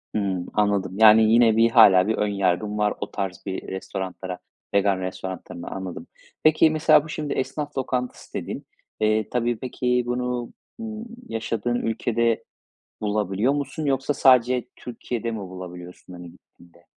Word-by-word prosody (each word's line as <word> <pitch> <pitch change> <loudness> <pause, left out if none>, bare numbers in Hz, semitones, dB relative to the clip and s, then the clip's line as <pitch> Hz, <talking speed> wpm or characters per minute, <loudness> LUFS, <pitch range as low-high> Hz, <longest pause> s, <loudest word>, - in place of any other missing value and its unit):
Hımm, 95 -4 -1
anladım, 100 -3 +1
yani, 110 0 +7
yine 115 -2 +5
bir 115 +1 +5
hâlâ 100 -5 +7
bir 110 - +1
ön 105 - +1
yargın 100 +1 0
var, 105 -1 +1
o - - -4
tarz 95 -2 -4
bir 95 -1 -4
restoranlara, 95 -1 -5 0.3
vegan 100 -1 +2
restoranlarına, 95 -1 -6
anladım. 95 -2 -6 0.4
Peki, 155 +1 +5
mesela, 155 -2 +4
bu, 155 - -11
şimdi 150 -1 -3
esnaf 145 +3 -4
lokantası 125 -1 -3
dedin. - - -5 0.3
Eee, 110 0 +1
tabii, 120 -1 0
peki, 125 -1 0
bunu, 125 0 -2 0.3
ımm, 220 0 -6 0.2
yaşadığın 115 +1 -2
ülkede 115 0 0 0.6
bulabiliyor 105 +3 0
musun? 145 +1 -3
Yoksa 135 +1 0
sadece 125 -2 +4
Türkiye'de 120 -1 -5
mi 110 - -4
bulabiliyorsun, 90 -2 -9
hani, 90 -1 -10
gittiğinde? 85 0 -22
110 Hz, 140 wpm, -24 LUFS, 95-125 Hz, 0.6 s, yani